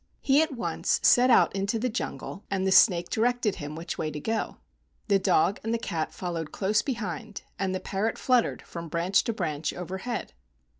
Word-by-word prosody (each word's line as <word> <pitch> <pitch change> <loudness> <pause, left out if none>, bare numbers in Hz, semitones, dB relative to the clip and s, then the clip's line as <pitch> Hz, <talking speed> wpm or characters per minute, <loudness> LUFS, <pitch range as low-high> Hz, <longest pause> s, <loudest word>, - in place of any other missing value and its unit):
He 275 +2 +4
at 320 -2 0
once 235 - 0
set 250 0 +6
out 235 - +5
into 200 +3 0
the 240 +3 -1
jungle, 225 -3 -5
and 190 -1 -1
the 190 - +2
snake 175 -3 +5
directed 240 -2 +1
him 145 +1 -6
which 165 +2 -6
way 155 - -1
to 150 0 -6
go. 220 +8 -2 0.5
The 200 -1 +4
dog 190 +1 +2
and 225 +1 -1
cat 170 -8 -3
followed 170 -4 -4
close 210 +2 +1
behind, 220 - -5 0.2
and 190 -1 -1
the - - -2
parrot 205 +4 -2
flut¬ 250 -2 +3
tered - - -5
from 170 -1 -8
branch 170 +4 +2
to 230 - -1
branch 155 -7 -2
overhead. 190 - -5
195 Hz, 190 wpm, -27 LUFS, 170-230 Hz, 0.5 s, set